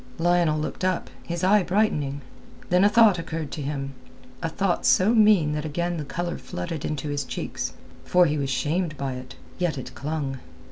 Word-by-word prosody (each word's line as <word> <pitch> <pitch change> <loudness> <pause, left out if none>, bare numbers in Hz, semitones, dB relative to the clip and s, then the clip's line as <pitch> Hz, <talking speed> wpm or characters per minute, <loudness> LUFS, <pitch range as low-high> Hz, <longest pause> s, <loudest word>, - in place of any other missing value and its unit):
Lionel 170 -2 +2
looked 155 - -4
up, 185 -1 0
his 170 +1 -4
eye 205 +3 +5
brightening. 175 -7 0 0.5
Then 180 +1 +5
a 205 - +6
thought 210 -4 +5
occurred 160 -2 -4
to 150 - -5
him; 140 -1 -3 0.5
a 165 - -1
thought 190 +2 0
so 200 +5 +4
mean 210 -9 +5
that 150 0 -2
again 170 +3 -2
the 155 - -3
colour 175 +4 -3
flooded 165 -4 -5
into 150 -1 -3
his 145 -1 -1
cheeks, - - -4 0.3
for 180 0 +4
he 150 -2 0
was 140 -1 -1
shamed 155 +4 -1
by 135 -2 -2
it. 125 0 -9 0.2
Yet 175 -4 0
it 130 - -7
clung. 140 -1 -3
165 Hz, 185 wpm, -25 LUFS, 145-180 Hz, 0.5 s, a